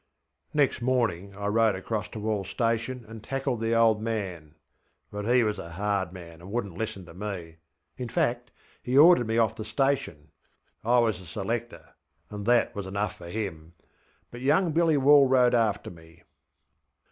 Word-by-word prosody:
ŌĆÖ - - -28
Next 145 -4 +2
morning 110 -7 0
I 100 0 -6
rode 110 0 +3
across 105 +3 -4
to - - -9
WallŌĆÖs 105 -2 -2
station 115 +2 -2
and 110 -1 -10
tackled 135 -3 -2
the 115 0 +1
old 115 -2 +4
man; 95 -9 -4 0.6
but 105 0 -5
he 120 +1 +4
was 105 -2 -1
a 85 -1 -8
hard 100 -1 -1
man, 85 -3 -11
and 90 - -11
wouldnŌĆÖt 100 -6 -3
listen 110 -4 -4
to 85 - -13
meŌĆöin 90 +4 -8
fact, 120 +1 -1 0.3
he 125 +2 0
ordered 155 -5 +7
me 115 +1 0
off 115 -2 +2
the 110 - -6
station. 105 - -1 0.5
I 120 +3 +3
was 110 -6 +2
a 90 - -13
selector, 100 -1 -4 0.4
and 105 0 -6
that 120 -1 +3
was 100 -2 -5
enough 100 0 -2
for 85 - -11
him. 85 -5 -5 0.6
But 120 - -9
young 160 +6 +2
Billy 160 -1 +3
Wall 140 0 +6
rode 125 -2 +4
after 110 -4 +1
me. 80 -1 -17
110 Hz, 170 wpm, -27 LUFS, 95-120 Hz, 0.6 s, ordered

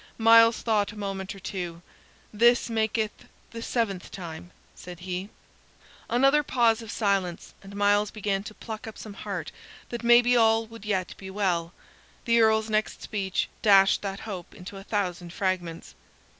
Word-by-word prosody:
Myles 230 0 +6
thought 210 -3 +1
a - - -13
moment 195 -1 -4
or - - -11
two. 175 -3 -6 0.5
"This 235 +2 +4
maketh 220 -1 -1 0.3
the 230 - -7
seventh 220 -6 -2
time," 170 -2 -8 0.2
said 180 -1 -11
he. 185 +2 -4 0.8
Another 275 +5 +4
pause 235 -5 +2
of 225 - -10
silence 195 -6 -1
followed, - - -18
and - - -8
Myles 205 0 +3
began 200 -2 -2
to 215 - -8
pluck 220 -1 -7
up 220 - -8
some 215 - -9
heart 195 -5 -5 0.4
that 240 0 -5
maybe 240 +1 +6
all 225 -1 +4
would 225 -1 -12
yet 190 -4 -1
be 190 - -9
well. 180 -4 -1 0.5
The 235 -1 +4
Earl's 220 0 +3
next 215 0 -1
speech 190 -4 -2
dashed 195 -2 +5
that 195 -1 -5
hope 190 -6 -7
into 195 0 -10
a 195 - -9
thousand 180 -4 -3
fragments. 175 -4 -3
205 Hz, 160 wpm, -26 LUFS, 190-225 Hz, 0.8 s, Myles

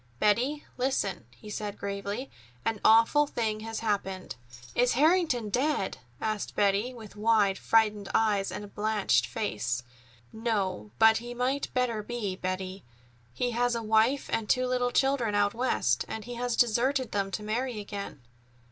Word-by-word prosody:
"Betty, 245 - +1
listen," 200 - -1
he 125 - -12
said 205 -1 -4
gravely. 200 +5 -4 0.3
"An 225 -2 -1
awful 230 +7 +5
thing 220 -5 -2
has 225 0 -5
happened." 195 - -2 0.4
"Is 245 0 +3
Harrington 305 - +3
dead?" 265 -4 0 0.2
asked 215 -2 -3
Betty, 205 +4 +2
with 220 -5 -11
wide, 210 -2 +3
frightened 210 -3 +2
eyes 205 -3 +2
and 205 -1 -7
blanched 205 - +1
face. 120 +1 -2 0.5
"No, 205 - -2
but 220 +6 +6
he 240 +1 -6
might 260 +3 -1
better 245 -4 +1
be, 210 -3 -3
Betty. 185 +1 -4 0.5
He 245 - -1
has 240 +1 +1
a 230 - -3
wife 220 +5 +2
and 220 -2 -1
two 255 0 +3
little 250 -1 +1
children 250 -4 +1
out 205 0 +2
West, 230 - +1
and 220 - -6
he 245 - -6
has 240 0 -1
deserted 250 +2 +2
them 200 -1 -1
to 210 +2 -4
marry 235 +2 -2
again." 200 -8 -6
220 Hz, 150 wpm, -29 LUFS, 200-245 Hz, 0.5 s, but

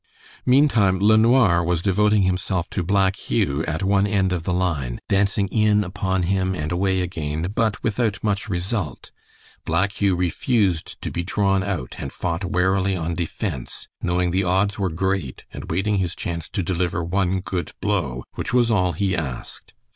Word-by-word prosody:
Meantime 125 -8 +4
LeNoir 110 -3 +5
was 85 0 0
devoting 105 +1 +3
himself 90 -1 0
to 95 - -1
Black 95 +1 +2
Hugh 70 -5 -1
at 80 +2 -2
one 100 +1 +3
end 95 -2 +1
of 85 -2 -3
the 90 - 0
line, 85 -10 -1
dancing 100 0 +2
in 105 0 +3
upon 95 -1 -1
him 95 +1 0
and 75 -2 -3
away 95 +1 +1
again, 80 -1 -3
but 110 -2 0
without 110 -3 0
much 105 0 -1
result. 90 -1 -3 0.5
Black 100 +1 +1
Hugh 100 -2 +3
refused 90 - 0
to - - -3
be 85 - -2
drawn 95 +1 +1
out, 90 -10 -4
and 70 - -5
fought 85 +1 -3
warily 95 +1 +1
on 85 -1 -2
defense, 85 - -4
knowing 90 0 0
the 95 +2 +1
odds 95 +3 +1
were 95 -2 +1
great 90 -4 -2
and - - -8
waiting 95 +4 +1
his 90 -2 -1
chance 85 -2 -4
to 95 - -2
deliver 85 -1 -1
one 95 +2 0
good 90 -1 -4
blow, 85 -12 -1
which - - -4
was 120 -2 +3
all 90 -4 +2
he 95 +3 0
asked. 65 -7 -6
95 Hz, 170 wpm, -22 LUFS, 85-100 Hz, 0.5 s, LeNoir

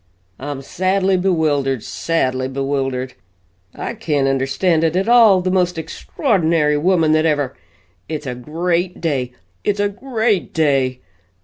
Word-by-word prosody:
I'm 140 0 -5
sadly 190 +4 +1
bewildered, 150 - 0
sadly 130 -6 -1
bewildered. 135 -1 -2 0.6
I - - -4
can't 150 -10 0
understand 135 +6 +1
it 165 +1 +1
at 190 +3 0
all 225 -6 +6
the 185 0 -1
most 180 -2 +1
extraordinary 160 - 0
woman 165 0 +2
that 155 +1 +3
ever 145 -4 0 0.5
it's 155 -1 -4
a 125 - -3
great 170 +7 -2
day, 130 -6 -2 0.3
it's 205 0 0
a 205 0 +2
great 220 -3 -1
day. 135 -5 +1
160 Hz, 130 wpm, -19 LUFS, 135-185 Hz, 0.6 s, all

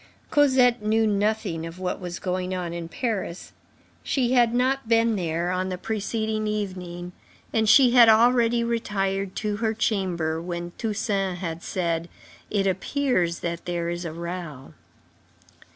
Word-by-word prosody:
Cosette 260 -5 +4
knew 220 +1 +2
nothing 205 -4 0
of 165 +1 -7
what 185 -1 -3
was 180 -1 -5
going 185 0 -2
on 175 -2 -4
in 170 -1 -5
Paris. 195 -3 -4 0.5
She 250 -3 0
had 240 -3 +4
not 255 0 0
been 230 -1 +3
there 170 -1 -1
on 185 +1 -1
the 185 - -3
preceding 220 +1 -2
evening, 180 -4 -4 0.4
and 220 -1 +2
she 255 +2 +7
had 240 -2 +8
already 235 +1 +4
retired 195 -4 -1
to 210 -1 -2
her 220 0 -1
chamber 175 -7 -1
when 175 0 -5
Toussaint 200 -4 -1
had 170 -2 -5
said: 170 -2 -2 0.4
"It 200 -2 0
appears 190 - 0
that 170 0 -4
there 170 -1 -2
is 175 +1 -4
a 165 - -4
row." 170 -5 -7
195 Hz, 145 wpm, -25 LUFS, 175-225 Hz, 0.5 s, had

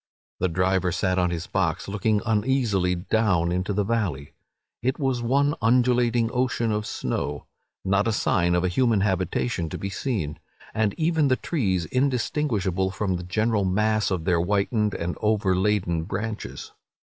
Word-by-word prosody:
The 95 - +2
driver 90 +1 +1
sat 95 0 0
on 90 0 +2
his 85 0 -3
box, 85 -5 -1
looking 105 +1 0
uneasily 105 -5 +1
down 90 -2 +1
into 90 +3 -1
the 100 +1 +1
valley. 95 -11 -2 0.5
It 130 +2 0
was 130 -4 0
one 140 +4 +2
undulating 120 0 +3
ocean 125 -2 0
of 105 0 -2
snow—not 95 +7 -3
a - - +2
sign 85 -4 +1
of 90 - +1
a - - +2
human 110 +2 +2
habitation 95 -1 -1
to - - -5
be 100 - -4
seen—and 100 - -3
even 160 -2 +2
the 130 - +3
trees 95 - -1
indistinguishable 120 - 0
from 95 -1 -2
the 90 - -7
general 105 +3 0
mass 105 +3 +1
by 95 - 0
their 85 +1 +1
whitened 105 +3 0
and 85 +1 -3
overladen 95 -5 +1
branches. 105 +3 -5
100 Hz, 150 wpm, -25 LUFS, 90-115 Hz, 0.5 s, undulating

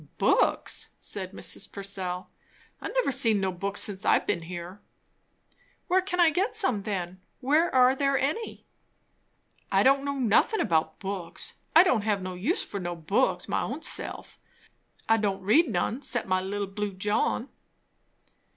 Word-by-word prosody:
"Books?" - - +1
said 190 -2 -4
Mrs. - - -4
Purcell. 190 -2 -4 0.5
"I've - - -4
never - - +2
seen 225 -5 +3
no 190 -1 0
books 195 +3 -2
since 200 -1 -1
I've - - +3
been 175 - -1
here." 175 +3 -8 1.1
"Where 375 0 +3
can 365 -1 -4
I 340 -2 +6
get 390 +8 0
some, 255 - +1
then? 185 -3 -4 0.2
Where 300 +6 +2
are 255 +1 +6
there 275 0 +1
any?" 305 - -3 1.1
"I - - +4
don't 275 +1 +4
know 280 0 -2
nothin' 255 - +3
about 160 -6 +1
books. 190 -3 -4 0.2
I 330 - +10
don't 260 - +2
have 205 -2 -1
no 185 0 -4
use 215 - 0
for 200 - -6
no 175 -1 -4
books, 185 +11 0
my - - 0
own - - -4
self. - - -4 0.7
I 225 - +4
don't 200 -3 -1
read 260 - +4
none 220 +6 -1
'cept 240 -6 -2
my 185 0 +1
'little 200 +2 -3
blue 200 +1 -4
John.'" 210 +6 0
205 Hz, 160 wpm, -27 LUFS, 190-275 Hz, 1.1 s, I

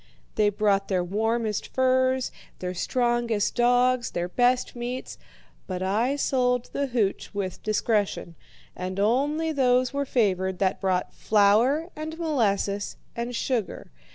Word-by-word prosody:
They 210 -1 +3
brought 200 -1 +1
their 185 -2 0
warmest 220 +3 -1
furs, 260 0 +1 0.3
their 180 0 -4
strongest 240 +1 0
dogs, 245 0 +3
their 175 0 -2
best 245 +7 +1
meats; 245 +2 -5 0.5
but 185 0 -3
I 225 +8 +1
sold 250 -3 0
the 280 0 -1
hooch 220 -6 -1
with 190 -3 -3
discretion, 210 -4 0 0.4
and 185 +1 -4
only 285 +9 +1
those 255 -3 +2
were 280 0 -1
favoured 190 -7 0
that 190 0 0
brought 185 -2 0
flour 230 - +3
and 315 +1 -6
molasses 205 - 0 0.2
and 235 +1 -3
sugar. 235 -4 -2
235 Hz, 125 wpm, -26 LUFS, 200-255 Hz, 0.5 s, They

